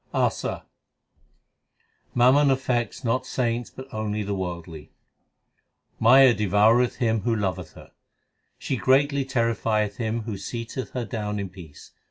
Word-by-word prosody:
ASA - - -1 1.5
Mammon 130 +4 +5
affects 130 -3 -1
not 120 +1 0
saints 120 -1 -2
but 130 +1 -11
only 105 -1 -2
the 100 0 -3
worldly: 85 -4 -6 1.1
Maya 130 +2 +7
devoureth 105 +4 +3
him 115 -2 0
who 115 +3 0
loveth 95 -5 -3
her; - - -15 0.7
She 135 - -3
greatly 140 +3 +2
terrifieth 115 -5 0
him 115 -1 -2
who 105 -3 -5
seateth 120 +4 -6
her 125 -2 -3
down 105 -3 -4
in 100 -2 -4
peace. 85 -5 -13
115 Hz, 125 wpm, -24 LUFS, 105-125 Hz, 1.5 s, Maya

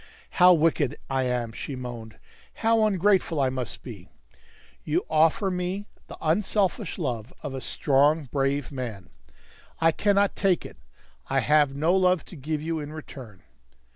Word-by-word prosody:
"How 180 0 +9
wicked 155 -4 +2
I 130 -1 +1
am!" 120 -2 -1
she 135 +4 -6
moaned. 120 -4 -8 0.4
"How 225 -1 +3
ungrateful 190 -4 +2
I 130 -2 +2
must 130 -2 -5
be! 100 -7 -10 0.7
You 160 +4 -1
offer 160 +5 +3
me 180 +3 -3 0.2
the - - -10
unselfish 190 +3 0
love 125 - -3
of 145 -3 -5
a 130 - -5
strong, 145 +5 +2
brave 140 0 -1
man. 120 -8 -6 0.7
I 165 0 +4
cannot 200 +3 +2
take 190 -3 +1
it. - - -10 0.5
I - - +1
have 150 -2 +3
no 160 +6 +2
love 185 -3 +2
to - - -12
give 150 +1 -4
you 165 0 -2
in 150 0 -6
return." 130 -10 -10
150 Hz, 150 wpm, -26 LUFS, 130-180 Hz, 0.7 s, How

